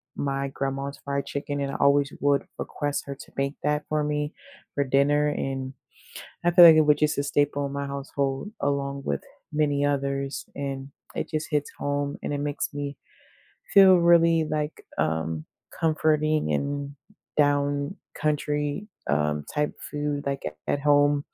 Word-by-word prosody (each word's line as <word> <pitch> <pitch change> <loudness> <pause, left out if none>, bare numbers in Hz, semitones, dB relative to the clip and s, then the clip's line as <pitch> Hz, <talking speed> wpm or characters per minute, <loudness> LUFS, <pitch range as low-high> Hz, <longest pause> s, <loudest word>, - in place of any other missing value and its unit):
my 140 -1 -1
grandma's 135 +1 -3
fried 140 0 -2
chicken, 145 0 -3
and 140 0 -2
I - - -6
always 140 0 +3
would 140 -1 +3
request 145 -1 -3
her 140 - -4
to 135 - -13
make 140 +1 -1
that 150 0 +1
for 155 -1 +1
me 150 0 -1 0.4
for 140 - +2
dinner, 140 +2 +3
and 135 -2 -3 0.7
I 175 - +5
feel 175 0 +9
like 165 -2 +10
it - - +7
was 150 -1 +4
just 150 -1 +1
a - - +2
staple 145 0 +1
in 140 - -6
my 140 0 -3
household 140 +3 -3
along 140 -1 -1
with - - -1 0.3
many 145 -2 +1
others, 140 -1 -1
and 135 -1 -4 0.3
it - - -3
just 155 0 -2
hits 150 -2 0
home, 145 0 -1
and - - -2
it - - -2
makes 145 0 -2
me 145 -1 -4 0.8
feel 190 -2 +8
really, 170 -1 +5
like, 150 0 -3
um, 80 0 -1 0.3
comforting, 155 -1 +2
and 140 0 -2 0.4
down 145 +3 +1 0.2
country, 150 +3 -1 0.2
um, 75 0 +1
type 150 0 0
of - - -17
food 145 -1 -2
like 140 0 -2
at 75 0 -5 0.2
at 140 - 0
home, 145 0 +3
145 Hz, 165 wpm, -26 LUFS, 140-150 Hz, 0.8 s, like